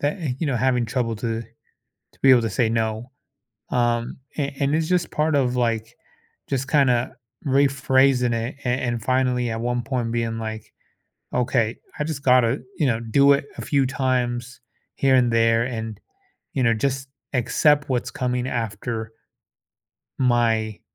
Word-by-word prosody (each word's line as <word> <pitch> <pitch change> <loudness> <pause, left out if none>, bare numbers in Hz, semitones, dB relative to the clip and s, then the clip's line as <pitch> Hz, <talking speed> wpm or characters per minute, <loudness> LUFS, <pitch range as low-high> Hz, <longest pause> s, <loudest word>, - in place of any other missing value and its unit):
that, 145 +6 -1
eh, 155 -7 -2
you 160 - -1
know, 135 -4 0
having 125 0 +2
trouble 115 -2 -1
to 115 +1 -3 0.5
to - - -34
be 135 - +5
able 125 -2 +7
to 115 - -1
say 110 +2 +1
no, 110 +2 -2 0.6
um, 120 -1 0 0.2
a 140 -2 -2
and 140 +2 +1
it's 160 0 0
just 180 -2 0
part 155 0 +1
of, 130 -3 +1
like, 115 -2 -1 0.5
just 135 0 -2
kinda 130 -5 +2 0.3
rephrasing 135 -2 +3
it 115 +3 -3
a - - -1
and 120 -2 -1
finally 125 -1 +1
at 110 0 -3
one 120 0 -1
point 120 -2 -2
being 115 -1 -1
like, 110 -1 -6 0.6
"Okay, 120 -2 +1 0.2
I - - +1
just 150 -2 -4
gotta," 125 0 +4 0.2
you 150 - +2
know, 115 -3 +1
"do 140 +5 +4
it 140 0 -1
a - - -5
few 140 -2 +1
times 125 -2 -1 0.4
here 135 -1 +3
and 125 -2 +3
there 115 0 +3
and," 110 -4 -5 0.5
you 130 - 0
know, 115 -2 +4
"just 135 +3 -2 0.2
accept 145 +4 +2
what's 125 -2 -1
coming 125 0 -2
after" 110 -1 -3 1.1
"my," 115 -4 +1
125 Hz, 160 wpm, -23 LUFS, 115-135 Hz, 1.1 s, able